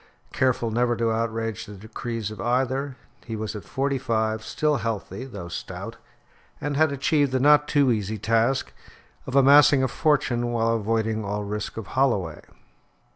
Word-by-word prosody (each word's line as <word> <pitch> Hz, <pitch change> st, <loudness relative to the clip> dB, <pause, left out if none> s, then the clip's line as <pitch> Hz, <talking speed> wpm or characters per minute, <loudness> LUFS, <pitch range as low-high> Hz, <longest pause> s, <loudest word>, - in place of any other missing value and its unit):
Careful 125 Hz, -3 st, +1 dB
never 120 Hz, +1 st, +1 dB
to 115 Hz, -1 st, +1 dB
outrage 115 Hz, -1 st, -2 dB
the 105 Hz, -, -9 dB
decrees 110 Hz, +1 st, -5 dB
of 105 Hz, -2 st, -8 dB
either, 130 Hz, +3 st, -1 dB, 0.3 s
he 115 Hz, -, -5 dB
was 110 Hz, 0 st, -4 dB
at 105 Hz, -, -6 dB
forty 135 Hz, 0 st, -1 dB
five 110 Hz, -3 st, -1 dB
still 150 Hz, +3 st, 0 dB
healthy, 115 Hz, +2 st, -4 dB
though 100 Hz, -9 st, -8 dB
stout; 85 Hz, -, -7 dB, 0.6 s
and 145 Hz, 0 st, -3 dB
had 155 Hz, +1 st, +3 dB
achieved 140 Hz, 0 st, +1 dB
the 130 Hz, -, +1 dB
not 150 Hz, +2 st, +5 dB
too 140 Hz, -3 st, +3 dB
easy 110 Hz, -1 st, -1 dB
task 115 Hz, +5 st, +1 dB, 0.5 s
of 130 Hz, -, -4 dB
amassing 140 Hz, 0 st, +6 dB
a -, -, +3 dB
fortune 135 Hz, -4 st, +1 dB
while 115 Hz, -1 st, +1 dB
avoiding 110 Hz, 0 st, -1 dB
all 105 Hz, +1 st, -3 dB
risk 105 Hz, +1 st, -5 dB
of 110 Hz, -, -5 dB
Holloway. 110 Hz, -, +1 dB
115 Hz, 160 wpm, -25 LUFS, 110-135 Hz, 0.6 s, amassing